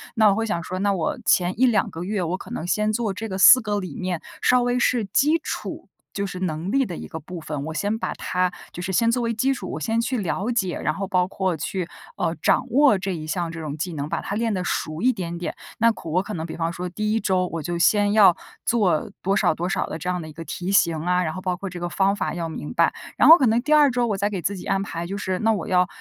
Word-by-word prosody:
那 220 Hz, -2 st, +5 dB
我 195 Hz, -, +3 dB
会 225 Hz, +1 st, -1 dB
想 170 Hz, -6 st, -2 dB
说， 185 Hz, +1 st, -5 dB
那 200 Hz, +1 st, +2 dB
我 280 Hz, +10 st, -1 dB
前 180 Hz, +3 st, +2 dB
1-2 240 Hz, -4 st, +3 dB
个 165 Hz, -2 st, -6 dB
月， 200 Hz, +1 st, -2 dB
我 175 Hz, +2 st, -2 dB
可 -, -, -11 dB
能 160 Hz, -, -4 dB
先 210 Hz, +3 st, +1 dB
做 220 Hz, -2 st, 0 dB
这 215 Hz, +4 st, -5 dB
个 190 Hz, -2 st, -4 dB
4 255 Hz, -, +9 dB
个 210 Hz, -2 st, -1 dB
理 185 Hz, -7 st, -6 dB
念， 180 Hz, -3 st, -3 dB, 0.2 s
稍 250 Hz, 0 st, +4 dB
微 245 Hz, 0 st, +1 dB
是 245 Hz, -2 st, +2 dB
基 295 Hz, -, +2 dB
础 -, -, -5 dB, 0.2 s
就 200 Hz, 0 st, -2 dB
是 185 Hz, -1 st, -6 dB
能 170 Hz, +1 st, -2 dB
力 270 Hz, -1 st, +3 dB
的 180 Hz, -, -6 dB
一 -, -, -7 dB
个 160 Hz, -, -7 dB
部 180 Hz, +3 st, -8 dB
分。 150 Hz, -2 st, -4 dB
我 160 Hz, -, -5 dB
先 205 Hz, +8 st, -1 dB
把 -, -, -3 dB
它 180 Hz, 0 st, -1 dB, 0.2 s
就 175 Hz, -, -6 dB
是 190 Hz, -, -3 dB
先 230 Hz, +5 st, +3 dB
作 245 Hz, 0 st, 0 dB
为 230 Hz, 0 st, 0 dB
基 260 Hz, +5 st, +1 dB
础， 195 Hz, -8 st, -6 dB
我 -, -, -4 dB
先 225 Hz, +9 st, 0 dB
去 245 Hz, +2 st, -1 dB
了 205 Hz, +3 st, -2 dB
解， 195 Hz, -7 st, -1 dB
然 155 Hz, -, -1 dB
后 195 Hz, +4 st, -4 dB
包 185 Hz, -2 st, +2 dB
括 190 Hz, -2 st, -1 dB
去， 175 Hz, +3 st, -3 dB, 0.3 s
呃， -, -, -1 dB
掌 -, -, +2 dB
握 275 Hz, -5 st, +5 dB
这 190 Hz, 0 st, -3 dB
一 155 Hz, -2 st, -6 dB
项 170 Hz, +2 st, -2 dB
这 165 Hz, -, -7 dB
种 150 Hz, -2 st, -4 dB
技 175 Hz, +3 st, -3 dB
能， 145 Hz, -1 st, -4 dB
把 -, -, -1 dB
它 200 Hz, -, -4 dB
练 225 Hz, 0 st, 0 dB
得 185 Hz, -, -1 dB
熟 155 Hz, -2 st, -2 dB
一 255 Hz, +3 st, +4 dB
点 170 Hz, -5 st, -5 dB
点， 175 Hz, -, -4 dB, 0.2 s
那 230 Hz, +1 st, +5 dB
可 170 Hz, -, -8 dB
我 175 Hz, +4 st, +2 dB
可 -, -, -7 dB
能 160 Hz, -2 st, -4 dB
比 160 Hz, -, -7 dB
方 165 Hz, 0 st, -1 dB
说 180 Hz, +1 st, -4 dB
第 210 Hz, +4 st, -2 dB
1 225 Hz, -, +2 dB
周， 185 Hz, -2 st, +1 dB
我 165 Hz, -2 st, -3 dB
就 175 Hz, +3 st, -2 dB
先 205 Hz, +4 st, +3 dB
要 200 Hz, -5 st, +7 dB, 0.3 s
做 200 Hz, -9 st, +1 dB
多 195 Hz, +2 st, +1 dB
少 -, -, +2 dB
多 175 Hz, +3 st, -2 dB
少 -, -, -1 dB
的 -, -, -5 dB
这 170 Hz, +3 st, -4 dB
样 180 Hz, -1 st, -1 dB
的 160 Hz, -, -8 dB
一 155 Hz, -, -10 dB
个 165 Hz, -, -8 dB
题 175 Hz, +4 st, -5 dB
型 170 Hz, -5 st, +3 dB
啊， 180 Hz, +3 st, +1 dB
然 160 Hz, -2 st, -2 dB
后 185 Hz, -, -6 dB
包 185 Hz, -1 st, -1 dB
括 195 Hz, +2 st, -6 dB
这 180 Hz, -1 st, -7 dB
个 175 Hz, -, -2 dB
方 195 Hz, +2 st, +2 dB
法 -, -, -2 dB
要 165 Hz, -1 st, -3 dB
明 155 Hz, -2 st, -6 dB
白。 -, -, +3 dB, 0.2 s
然 -, -, +6 dB
后 330 Hz, -, +11 dB
可 265 Hz, -, +3 dB
能 230 Hz, +2 st, +3 dB
第 300 Hz, +4 st, +1 dB
2 300 Hz, -2 st, +6 dB
周 245 Hz, -1 st, +1 dB
我 205 Hz, -3 st, -1 dB
再 200 Hz, +1 st, 0 dB
给 195 Hz, -4 st, -4 dB
自 200 Hz, +3 st, -2 dB
己 -, -, -9 dB
安 195 Hz, 0 st, 0 dB
排， 170 Hz, -3 st, -5 dB
就 195 Hz, +2 st, -4 dB
是 185 Hz, -2 st, -2 dB
那 225 Hz, 0 st, +3 dB
我 205 Hz, -, -3 dB
要 180 Hz, -1 st, +3 dB
190 Hz, 300 characters per minute, -23 LUFS, 175-215 Hz, 0.3 s, 后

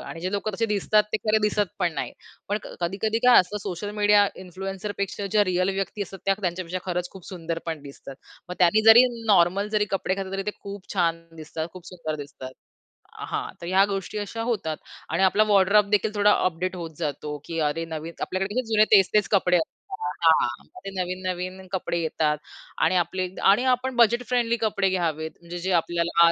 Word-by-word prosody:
आणि 165 Hz, -, -8 dB
जे 185 Hz, -, -2 dB
लोकं 205 Hz, +1 st, -2 dB
तसे 230 Hz, +2 st, 0 dB
दिसतात, 210 Hz, +1 st, +2 dB
ते -, -, +3 dB
खरं 215 Hz, 0 st, +4 dB
दिसत 210 Hz, -2 st, +1 dB
पण 175 Hz, -3 st, +1 dB
नाही. -, -, -3 dB, 0.4 s
पण 205 Hz, -, 0 dB
क -, -, -9 dB
कधी-कधी 200 Hz, +6 st, -1 dB
काय 250 Hz, -, +9 dB
असतं 195 Hz, +3 st, -4 dB
सोशल 200 Hz, +1 st, -4 dB
मीडिया 205 Hz, 0 st, +5 dB, 0.2 s
इन्फ्लुएन्सरपेक्षा 195 Hz, +2 st, -4 dB
ज्या 210 Hz, -1 st, +4 dB
रिअल 185 Hz, 0 st, +1 dB
व्यक्ती 195 Hz, +1 st, -3 dB
असतात, 195 Hz, 0 st, -8 dB
त्या 195 Hz, 0 st, +3 dB
त्यांच्यापेक्षा 180 Hz, 0 st, -3 dB
खरंच 180 Hz, -1 st, -2 dB
खूप 190 Hz, -3 st, -12 dB
सुंदर 165 Hz, -3 st, -4 dB
पण 160 Hz, -2 st, -3 dB
दिसतात. 140 Hz, -1 st, -10 dB, 0.3 s
मग 180 Hz, -, -5 dB
त्यांनी 190 Hz, +5 st, +4 dB
जरी 240 Hz, +3 st, +9 dB, 0.2 s
नॉर्मल 195 Hz, +1 st, +3 dB
जरी 210 Hz, -1 st, +1 dB
कपडे 190 Hz, -1 st, 0 dB
घातले, 195 Hz, -1 st, -5 dB
तरी 195 Hz, 0 st, -2 dB
ते 210 Hz, -, -1 dB
खूप 200 Hz, -1 st, -8 dB
छान 165 Hz, -3 st, 0 dB
दिसतात, 160 Hz, +1 st, -5 dB
खूप 180 Hz, -1 st, -12 dB
सुंदर 160 Hz, -4 st, -5 dB
दिसतात. 130 Hz, -3 st, -9 dB, 0.7 s
अ, -, -, -6 dB
हां, -, -, -3 dB
तर 170 Hz, -, -6 dB
ह्या 190 Hz, +2 st, +4 dB
गोष्टी 195 Hz, +2 st, -4 dB
अशा 210 Hz, +3 st, -5 dB
होतात. 195 Hz, -10 st, -2 dB, 0.3 s
आणि 190 Hz, -, +1 dB
आपला 205 Hz, +3 st, +4 dB
वॉर्डरोब 200 Hz, +1 st, +4 dB
देखील 210 Hz, +1 st, +2 dB
थोडा 205 Hz, 0 st, +5 dB
अ, -, -, +2 dB
अपडेट 185 Hz, +1 st, -1 dB
होत 165 Hz, -3 st, -7 dB
जातो 150 Hz, -1 st, -3 dB
की 165 Hz, -1 st, -4 dB
अरे, 165 Hz, +3 st, -3 dB
नवीन 160 Hz, +1 st, -6 dB
आपल्याकडे 190 Hz, +2 st, -2 dB
कसे 255 Hz, -1 st, 0 dB
जुने 215 Hz, 0 st, +6 dB
तेच-तेच 200 Hz, +1 st, +4 dB
कपडे 180 Hz, -3 st, +4 dB
असतात 160 Hz, -, -3 dB, 0.5 s
हां. 160 Hz, -7 st, +3 dB, 0.2 s
ते -, -, -3 dB
नवीन-नवीन 185 Hz, +1 st, -4 dB
कपडे 180 Hz, -2 st, -2 dB
येतात 155 Hz, -2 st, 0 dB, 0.5 s
आणि 185 Hz, -, +3 dB
आपले 180 Hz, +2 st, -1 dB, 0.2 s
आणि 205 Hz, +6 st, +5 dB
आपण 255 Hz, +1 st, -2 dB
बजेट 235 Hz, +1 st, +4 dB
फ्रेंडली 235 Hz, -1 st, +1 dB
कपडे 210 Hz, -3 st, +1 dB
घ्यावेत 160 Hz, -4 st, -1 dB
म्हणजे 170 Hz, +1 st, -7 dB
जे 190 Hz, +2 st, -2 dB
आपल्याला 170 Hz, 0 st, +3 dB
आ 170 Hz, -, +5 dB
185 Hz, 195 wpm, -25 LUFS, 170-205 Hz, 0.7 s, काय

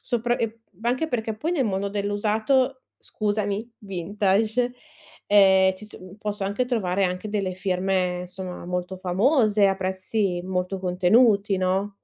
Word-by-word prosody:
Sopra 240 Hz, 0 st, 0 dB
e 230 Hz, 0 st, -3 dB, 0.2 s
anche 255 Hz, +7 st, 0 dB
perché, 220 Hz, -5 st, -2 dB
poi, 320 Hz, +10 st, -2 dB
nel 275 Hz, -7 st, +1 dB
mondo 200 Hz, -1 st, -1 dB
dell'usato 215 Hz, +6 st, 0 dB, 0.2 s
scusami, 210 Hz, +1 st, -2 dB
vintage, 205 Hz, +5 st, 0 dB, 0.5 s
ehm, 190 Hz, -2 st, +5 dB
ci 210 Hz, +3 st, -11 dB
so 210 Hz, -, -8 dB
uhm 185 Hz, +1 st, -12 dB
posso 210 Hz, -2 st, -3 dB
anche 200 Hz, +6 st, 0 dB
trovare 195 Hz, -6 st, 0 dB
anche 180 Hz, +3 st, -2 dB
delle 195 Hz, -3 st, -1 dB
firme, 185 Hz, -1 st, 0 dB
insomma, 180 Hz, 0 st, -7 dB
molto 180 Hz, +1 st, -3 dB
famose 210 Hz, -, +3 dB
a 195 Hz, -, +2 dB
prezzi 185 Hz, -1 st, -1 dB
molto 185 Hz, +1 st, -2 dB
contenuti, 200 Hz, +3 st, +3 dB
no? 190 Hz, +2 st, 0 dB
200 Hz, 140 wpm, -24 LUFS, 185-220 Hz, 0.5 s, ehm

